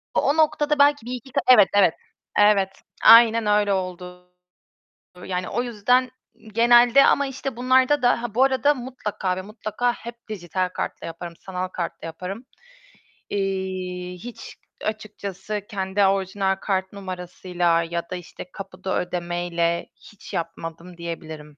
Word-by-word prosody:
o 290 Hz, +3 st, +2 dB
noktada 300 Hz, -1 st, +2 dB
belki 285 Hz, -4 st, +4 dB
bir 245 Hz, -, -6 dB
iki 250 Hz, +1 st, -8 dB, 0.2 s
evet, 210 Hz, -6 st, +8 dB
evet, 185 Hz, -5 st, +5 dB, 0.5 s
evet, 205 Hz, -2 st, +5 dB, 0.4 s
aynen 230 Hz, -1 st, +8 dB
öyle 210 Hz, -1 st, +3 dB
oldu. 180 Hz, -1 st, -5 dB, 0.9 s
Yani 180 Hz, -1 st, -3 dB
o 240 Hz, +4 st, -1 dB
yüzden 245 Hz, +2 st, +1 dB, 0.4 s
genelde 240 Hz, +3 st, +6 dB
ama 280 Hz, -, +3 dB
işte 270 Hz, -1 st, -5 dB
bunlarda 260 Hz, +3 st, +3 dB
da 245 Hz, -1 st, +3 dB
ha 235 Hz, -3 st, -5 dB
bu 255 Hz, -, +5 dB
arada 270 Hz, +2 st, +3 dB
mutlaka 240 Hz, -7 st, -4 dB
ve 185 Hz, -, -4 dB
mutlaka 215 Hz, +4 st, -2 dB
hep 235 Hz, +1 st, -9 dB
dijital 185 Hz, -2 st, -2 dB
kartla 180 Hz, -, -5 dB
yaparım, 170 Hz, +1 st, -7 dB
sanal 185 Hz, -1 st, -4 dB
kartla 175 Hz, -3 st, -5 dB
yaparım. 185 Hz, +8 st, -7 dB, 0.8 s
Eee, 185 Hz, -2 st, -3 dB
hiç 225 Hz, +7 st, -10 dB, 0.3 s
açıkçası, 210 Hz, -1 st, -5 dB
kendi 195 Hz, -1 st, 0 dB
orijinal 195 Hz, 0 st, +1 dB
kart 190 Hz, 0 st, -2 dB
numarasıyla 180 Hz, -2 st, -1 dB
ya 170 Hz, 0 st, -4 dB
da 185 Hz, -, -4 dB
işte 180 Hz, 0 st, -10 dB
kapıda 190 Hz, -1 st, -4 dB
ödemeyle 175 Hz, -1 st, -2 dB
hiç 210 Hz, -, -14 dB
yapmadım 165 Hz, +1 st, -6 dB
diyebilirim. 160 Hz, -3 st, -8 dB
195 Hz, 130 wpm, -23 LUFS, 180-235 Hz, 0.9 s, evet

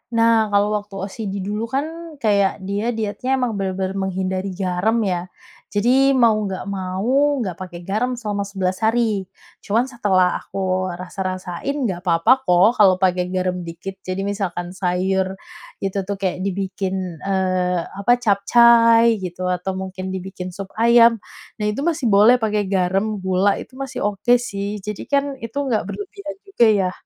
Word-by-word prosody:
Nah 230 Hz, -1 st, +4 dB
kalau 205 Hz, 0 st, +2 dB
waktu 205 Hz, -1 st, -13 dB
OCD 195 Hz, -1 st, -4 dB
dulu 210 Hz, +3 st, -3 dB
kan, 320 Hz, +5 st, -4 dB
kayak 200 Hz, -2 st, +2 dB
dia 205 Hz, +5 st, -2 dB
dietnya 225 Hz, +4 st, -1 dB
emang 245 Hz, -6 st, -1 dB
benar-benar 190 Hz, -1 st, -2 dB, 0.2 s
menghindari 190 Hz, 0 st, -3 dB
garam 185 Hz, +3 st, 0 dB
ya. 180 Hz, -3 st, -2 dB, 0.4 s
Jadi 260 Hz, +6 st, +3 dB
mau 235 Hz, -3 st, +5 dB, 0.2 s
enggak 190 Hz, -1 st, -4 dB
mau, 200 Hz, +10 st, 0 dB
enggak 185 Hz, -3 st, -5 dB
pakai 175 Hz, -2 st, -8 dB
garam 220 Hz, +7 st, -1 dB
selama 205 Hz, -4 st, -3 dB
11 190 Hz, -2 st, -2 dB
hari. 220 Hz, -3 st, +1 dB, 0.3 s
Cuman 225 Hz, +4 st, +1 dB
setelah 190 Hz, -6 st, +2 dB
aku 185 Hz, -1 st, -2 dB
rasa-rasain, 185 Hz, +6 st, -4 dB
enggak 190 Hz, -5 st, -3 dB
papa 170 Hz, +10 st, +4 dB
kok 210 Hz, 0 st, +3 dB
kalau 195 Hz, -3 st, +6 dB
pakai 180 Hz, -1 st, +1 dB
garam 185 Hz, 0 st, -1 dB
dikit. 190 Hz, +4 st, -8 dB
Jadi 185 Hz, +1 st, -4 dB
misalkan 190 Hz, -3 st, -3 dB
sayur 190 Hz, +1 st, -1 dB, 0.5 s
itu 195 Hz, 0 st, -2 dB
tuh, 200 Hz, -, -2 dB
kayak 190 Hz, -2 st, -2 dB
dibikin, 190 Hz, -2 st, -3 dB
eee, 185 Hz, -2 st, 0 dB
apa, 200 Hz, +7 st, -2 dB
capcai 230 Hz, +1 st, +5 dB
gitu, 185 Hz, -1 st, -6 dB
atau 180 Hz, +1 st, -2 dB
mungkin 190 Hz, 0 st, -5 dB
dibikin 185 Hz, -1 st, -6 dB
sup 195 Hz, -1 st, -7 dB
ayam. 235 Hz, 0 st, +6 dB, 0.4 s
Nah 210 Hz, -, -1 dB
itu 215 Hz, +7 st, -2 dB
masih 315 Hz, -6 st, 0 dB
boleh 215 Hz, +4 st, +6 dB
pakai 210 Hz, -2 st, 0 dB
garam, 195 Hz, +3 st, 0 dB
gula, 190 Hz, +1 st, +1 dB
itu 260 Hz, -, -11 dB
masih 270 Hz, -1 st, -5 dB
oke 225 Hz, +5 st, +2 dB
sih. 205 Hz, -3 st, -4 dB
Jadi 210 Hz, +1 st, -6 dB
kan 280 Hz, 0 st, +1 dB
itu 230 Hz, +4 st, -6 dB
enggak 225 Hz, -4 st, +1 dB
berlebihan 390 Hz, -, -7 dB
juga 385 Hz, -12 st, +3 dB
ya. 190 Hz, -3 st, +1 dB
200 Hz, 155 wpm, -21 LUFS, 185-230 Hz, 0.5 s, kalau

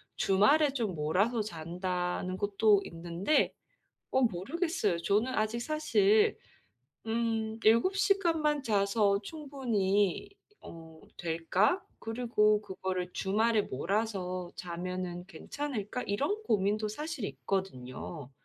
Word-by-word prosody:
주말에 270 Hz, +10 st, +4 dB
좀 220 Hz, -9 st, -2 dB
몰아서 195 Hz, +10 st, +1 dB
잔다는 180 Hz, 0 st, -3 dB
것도 205 Hz, 0 st, +3 dB
있는데 170 Hz, -, 0 dB, 0.6 s
어 265 Hz, -, +3 dB
모르겠어요. 240 Hz, -, 0 dB
저는 205 Hz, +9 st, +1 dB
아직 220 Hz, 0 st, 0 dB
사실 220 Hz, -8 st, +3 dB, 0.7 s
음 225 Hz, -1 st, -1 dB
'7 235 Hz, -, +4 dB
시간만 330 Hz, -8 st, +2 dB
자서 200 Hz, -2 st, +2 dB
충분히 235 Hz, -, -1 dB, 0.3 s
어 160 Hz, -1 st, -12 dB, 0.2 s
될까? 175 Hz, -, +1 dB, 0.2 s
그리고 225 Hz, -2 st, +2 dB
그거를 185 Hz, -2 st, -4 dB
주말에 215 Hz, +2 st, +2 dB
몰아서 185 Hz, -, -2 dB
자면은 180 Hz, 0 st, -5 dB
괜찮을까?' 250 Hz, +1 st, -4 dB
이런 285 Hz, -, -1 dB
고민도 210 Hz, -, +1 dB
사실 300 Hz, +1 st, -5 dB
있거든요. 145 Hz, -7 st, -4 dB
205 Hz, 225 characters per minute, -31 LUFS, 185-240 Hz, 0.7 s, 주말에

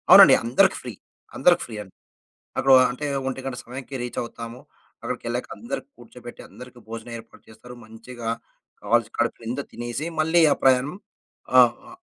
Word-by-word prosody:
అవునండి. -, -, +10 dB
అందరికి 120 Hz, +2 st, +3 dB
ఫ్రీ. -, -, -7 dB, 0.4 s
అందరికి -, -, +4 dB
ఫ్రీ 115 Hz, -, -9 dB
అండి. 95 Hz, -3 st, -13 dB, 0.7 s
అక్కడో 135 Hz, -1 st, +5 dB, 0.2 s
అంటే, 130 Hz, +4 st, -5 dB, 0.2 s
ఒంటి 135 Hz, 0 st, -4 dB
గంట 135 Hz, -2 st, -4 dB
సమయానికి 130 Hz, +3 st, -9 dB
రీచవుతాము. 120 Hz, 0 st, -6 dB, 0.4 s
అక్కడికెళ్ళాక -, -, -4 dB
అందరికి -, -, -6 dB
కూర్చోబెట్టి, -, -, -12 dB
అందరికి 125 Hz, 0 st, -13 dB
భోజనం 115 Hz, +1 st, -8 dB
ఏర్పాటు 115 Hz, 0 st, -16 dB
చేస్తారు. 110 Hz, +3 st, -13 dB
మంచిగా 115 Hz, +1 st, -9 dB, 0.5 s
కావాల్సి 115 Hz, +1 st, +1 dB
కడుపు 120 Hz, -, 0 dB
నిందా 120 Hz, +5 st, -3 dB
తినేసి, 120 Hz, +6 st, -5 dB
మళ్ళీ 160 Hz, +2 st, +3 dB
ఆ -, -, +4 dB
ప్రయాణం 130 Hz, +4 st, +3 dB, 0.6 s
ఆహ్, 120 Hz, -2 st, +7 dB
ఆహ్, 365 Hz, -, -14 dB
120 Hz, 145 wpm, -24 LUFS, 115-130 Hz, 0.7 s, అవునండి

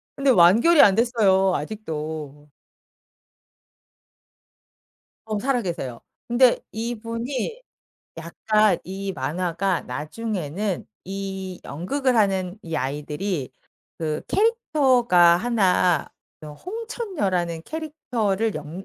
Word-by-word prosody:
근데 275 Hz, 0 st, +1 dB
완결이 235 Hz, -, +6 dB
안 195 Hz, -, +6 dB
됐어요 200 Hz, -5 st, +3 dB
아직도. 150 Hz, -5 st, -6 dB, 2.7 s
어 215 Hz, -1 st, -3 dB
살아 250 Hz, +2 st, 0 dB
계세요. 135 Hz, -, -5 dB, 0.3 s
근데 240 Hz, +1 st, +4 dB
이분이 235 Hz, -, -4 dB, 0.6 s
약간 210 Hz, +6 st, +1 dB
이 195 Hz, +1 st, -5 dB
만화가 175 Hz, +5 st, -1 dB
나중에는 190 Hz, +1 st, -4 dB, 0.2 s
이 190 Hz, -1 st, -5 dB
연극을 250 Hz, -, -1 dB
하는 190 Hz, -2 st, +1 dB
이 165 Hz, -1 st, -6 dB
아이들이 150 Hz, +3 st, -3 dB, 0.5 s
그 155 Hz, -2 st, -2 dB
캐릭터가 260 Hz, -, +4 dB
1 185 Hz, -7 st, +2 dB, 0.3 s
요 150 Hz, -, -8 dB
홍천녀라는 320 Hz, -, -3 dB
캐릭터를 235 Hz, -10 st, -2 dB
연 155 Hz, +5 st, -7 dB
195 Hz, 190 characters per minute, -23 LUFS, 170-240 Hz, 2.7 s, 완결이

